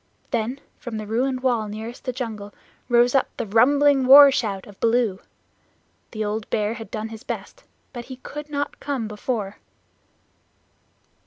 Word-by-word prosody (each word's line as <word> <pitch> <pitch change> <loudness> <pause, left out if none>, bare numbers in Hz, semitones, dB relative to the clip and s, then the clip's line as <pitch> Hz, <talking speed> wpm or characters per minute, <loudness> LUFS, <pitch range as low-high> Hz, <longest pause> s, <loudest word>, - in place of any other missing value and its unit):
Then 240 +2 -1 0.2
from 240 -4 -6
the 215 - -5
ruined 255 +4 -1
wall 240 -4 +1
nearest 220 +3 -8
the 255 - -1
jungle 220 -5 -6 0.3
rose 240 0 +4
up 270 - +3
the 235 - -2
rumbling 270 +5 +4
war 280 +1 +10
shout 200 -7 -2
of 205 -1 -15
Baloo. 230 -4 +1 0.9
The 215 -2 -4
old 210 +1 -3
Bear 210 0 0
had 225 -1 -9
done 220 0 -4
his 220 -1 -9
best, - - -7 0.3
but 240 -2 -7
he 260 +1 -8
could 295 +3 -9
not 285 0 -3
come 270 -6 -3
before. 210 -1 -4
235 Hz, 155 wpm, -23 LUFS, 215-260 Hz, 0.9 s, war